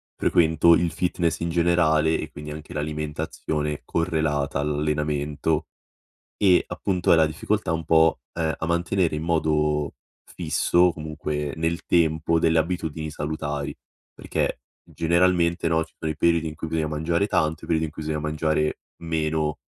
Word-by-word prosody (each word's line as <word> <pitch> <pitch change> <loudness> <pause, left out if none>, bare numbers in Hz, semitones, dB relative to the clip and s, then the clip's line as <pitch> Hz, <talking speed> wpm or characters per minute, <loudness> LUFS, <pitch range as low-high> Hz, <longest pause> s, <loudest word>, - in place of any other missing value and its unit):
frequento 80 0 +4
il 85 0 +1
fitness 85 -2 -1
in 85 0 -2
generale 80 -2 +3
e - - -5
quindi 75 0 -8
anche 75 0 -9
l'alimentazione 75 0 -3
correlata 80 -5 0
all'allenamento. 75 +1 -1 0.7
E 95 -3 +4
appunto 90 -3 0
è - - +7
la 80 -1 +5
difficoltà 75 +1 -1
un 80 0 -1
po', 80 0 +4 0.2
uhm, 80 -1 0
a - - -3
mantenere 85 0 +1
in 75 - -3
modo 75 -3 +1 0.3
fisso, 85 +2 +2
comunque 75 -2 -4
nel 80 +2 -1
tempo, 80 -1 +2
delle 80 0 +3
abitudini 80 -2 -2
salutari 75 -1 -4 0.4
perché, - - -2 0.2
generalmente, 85 0 +1
no, 80 0 +2
ci - - -27
sono 80 - -2
i - - -6
periodi 85 0 +2
in 80 - -5
cui 80 - -5
bisogna 80 -1 -1
mangiare 80 +5 0
tanto, 80 -4 0
i - - -8
periodi 80 -1 +1
in 75 - -7
cui 80 - -7
bisogna 75 0 -2
mangiare 75 0 0 0.2
meno 80 -2 -1
80 Hz, 150 wpm, -24 LUFS, 75-85 Hz, 0.7 s, è